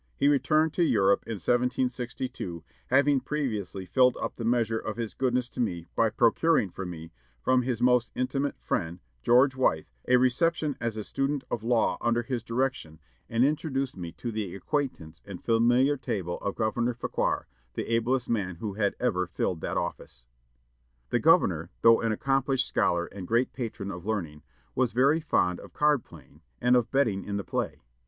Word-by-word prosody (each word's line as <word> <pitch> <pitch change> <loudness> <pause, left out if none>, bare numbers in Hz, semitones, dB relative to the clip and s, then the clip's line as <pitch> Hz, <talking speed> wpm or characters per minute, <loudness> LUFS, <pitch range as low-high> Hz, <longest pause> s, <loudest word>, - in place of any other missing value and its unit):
He 140 - +2
returned 150 +3 +3
to 175 - +2
Europe 100 -10 +3
in 115 - -3
1762, 125 -4 -2 0.2
having 140 +1 +4
previously 110 - -3
filled 125 +7 +3
up - - -3
the 115 - -6
measure 115 -1 +1
of 110 -1 -5
his 115 -2 -4
goodness 125 -1 0
to - - -11
me 90 -8 -1
by 115 - +3
procuring 115 - +2
for 95 +1 -6
me, 80 -1 -8 0.3
from 130 - +2
his 120 -1 -2
most 125 -2 +3
intimate 135 +2 -1
friend, 85 0 -2 0.2
George 130 - +4
Wythe, 105 -12 +1 0.2
a 125 - +5
reception 145 +4 +1
as 115 -2 -2
a 105 - -3
student 135 +4 -2
of 115 - -1
law 115 -5 +1
under 120 0 +1
his 125 -1 -3
direction, 115 - -2 0.3
and 115 +3 +3
introduced 140 -3 -1
me 85 -2 -6
to 120 - -5
the 105 -5 -4
acquaintance 100 - -3
and 100 -3 -10
familiar 120 +5 +3
table 90 -9 -3
of 100 - -3
Governor 120 +2 0
Fauquier, 120 - -1 0.3
the - - -2
ablest 125 +2 +1
man 95 -6 -1
who 100 +4 -5
had 100 0 0
ever 90 -8 0
filled 85 +1 -2
that - - -2
office." - - -5 0.9
The - - +2
governor, 80 +2 +3
though 115 0 +7
an 115 - 0
accomplished 135 +2 +1
scholar 85 0 +1
and 95 0 -9
great 120 +5 +1
patron 110 -5 -5
of 90 +1 -8
learning, 85 -9 -3 0.3
was 125 -2 0
very 140 +6 +4
fond 90 - +1
of - - -13
card 150 -4 +2
playing, 75 -6 -17 0.2
and 125 0 +4
of 120 -2 +2
betting 115 -9 +1
in 100 0 -3
the 100 - -3
play. - - -3
120 Hz, 175 wpm, -28 LUFS, 100-130 Hz, 0.9 s, though